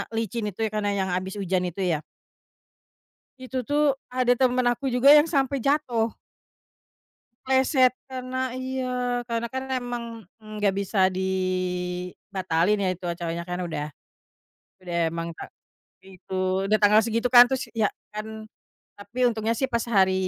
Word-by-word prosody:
licin 225 0 -2
itu 195 - -14
ya - - -1
karena 205 -1 0
yang 190 -1 -1
habis 185 +1 -3
hujan 185 -1 0
itu 185 +3 -7
ya. 150 - -1 1.4
Itu 255 -1 -5
tuh 290 -2 +2
ada 250 -1 +1
teman 255 -1 +3
aku 270 +3 -3
juga 255 +2 +5
yang 295 +2 +8
sampai 275 -3 +1
jatuh. 245 -5 0 1.3
Pleset 260 -1 +4 0.2
karena 255 0 -4
iya 250 -1 -2
karena 230 0 -1
kan 260 0 -4
emang 245 -2 -3 0.4
ng 215 0 -10
nggak 205 -2 +2
bisa 190 -1 +2
dibatalin 185 0 -1
ya 190 - +1
itu 185 - -15
acaranya 170 0 -3
kan 180 +1 -4
udah 160 -4 -3 1.0
udah 175 -1 -6 0.2
emang 165 0 -3
ta 165 - -8 0.6
itu, 190 0 -12 0.4
udah 215 - +4
tanggal 210 +1 +5
segitu 230 +2 -1
kan 245 +1 +9
terus 265 0 -1
ya 220 -2 +2 0.2
kan, 220 +1 -6 0.5
tapi 225 +5 -2
untungnya 225 -1 0
sih 265 - +1
pas 235 -3 -1
hari 190 -3 +4
225 Hz, 145 wpm, -25 LUFS, 190-255 Hz, 1.4 s, kan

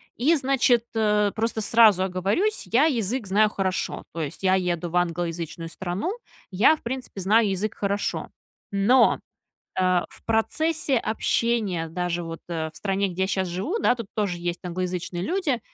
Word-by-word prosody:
И, 300 +8 +3
значит, 255 -4 +2
э, 210 -2 +2
просто 225 0 -1
сразу 210 -3 +5
оговорюсь: 195 - -1
я 265 +6 +5
язык 235 -5 -1
знаю 210 +3 +4
хорошо. 190 -3 -2
То 165 - -4
есть, 145 - -5
я 190 0 +4
еду 175 -2 -1
в 175 - -6
англоязычную 170 -1 -2
страну. 190 - -3 0.4
Я 205 +11 +5
в - - -18
принципе 250 -4 -5
знаю 210 +2 +4
язык 195 +3 -2
хорошо. 200 0 -2 0.4
Но, 205 +6 +4 0.6
а, 185 -1 +2
в - - -18
процессе 285 +6 +1
общения, 220 -6 0
даже 175 +1 -2
вот, 165 0 -7
э, 160 -2 -3
в - - -20
стране, 195 0 0
где 185 +1 -3
я - - +2
щас 190 -2 -1
живу, 195 - -2
да, 250 - +3
тут 230 -4 -7
тоже 200 -5 -1
есть 175 0 -3
англоязычные 180 0 -3
люди, 310 - 0
200 Hz, 165 wpm, -25 LUFS, 180-235 Hz, 0.6 s, сразу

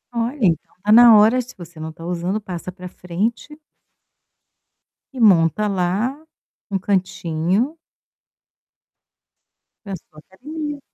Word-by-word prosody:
Olha, 235 +5 -2
então 165 -3 0
tá 210 - +1
na 230 -1 +9
hora. 225 +5 +5
Se 250 - -13
você 170 -2 -12
não 160 0 -5
está 165 +1 -11
usando, 180 +4 -2
passa 185 -3 -7
para 180 0 -10
frente 210 - -4 1.6
e - - -6
monta 200 -1 +4
lá, 200 +8 -1 0.5
um 195 - 0
cantinho 185 - -1 2.1
para 195 -2 -5
sua 155 -3 -19
academia. 295 - -7
195 Hz, 115 wpm, -20 LUFS, 175-235 Hz, 2.1 s, na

